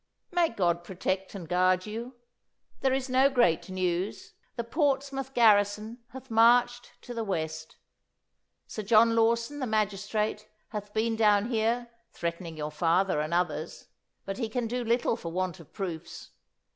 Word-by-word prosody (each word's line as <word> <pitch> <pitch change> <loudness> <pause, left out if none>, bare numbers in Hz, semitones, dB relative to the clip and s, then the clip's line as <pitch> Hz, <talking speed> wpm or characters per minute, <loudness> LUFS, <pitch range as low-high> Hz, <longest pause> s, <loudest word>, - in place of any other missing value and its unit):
'"May 350 -2 +3
God 175 -5 0
protect 190 +2 -3
and 180 -4 -7
guard 185 +1 +2
you! 230 +4 -6 0.6
There 265 - +2
is 265 0 0
no 260 +1 +4
great 240 - +2
news. 185 +1 -2 0.2
The 235 - -2
Portsmouth 270 0 -1
garrison 215 0 +3
hath 260 -2 -11
marched 240 +2 +4
to 245 - -7
the 230 -1 -2
West. 160 -5 -4 0.9
Sir 215 - -6
John 225 +2 +5
Lawson, 230 +5 +1
the 260 - -2
magistrate, 210 0 -1 0.2
hath 210 -2 -6
been 225 +1 0
down 210 0 +3
here 235 +1 0 0.2
threatening 170 -1 -5
your 150 0 -4
father 170 +3 +2
and 155 +1 -3
others, 170 -2 -2 0.4
but 195 +4 -5
he 230 -3 -2
can 245 +1 -2
do 245 +2 -2
little 235 0 +1
for 170 -8 -7
want 185 0 -2
of 165 - -15
proofs. 175 -4 -6
215 Hz, 150 wpm, -28 LUFS, 185-240 Hz, 0.9 s, John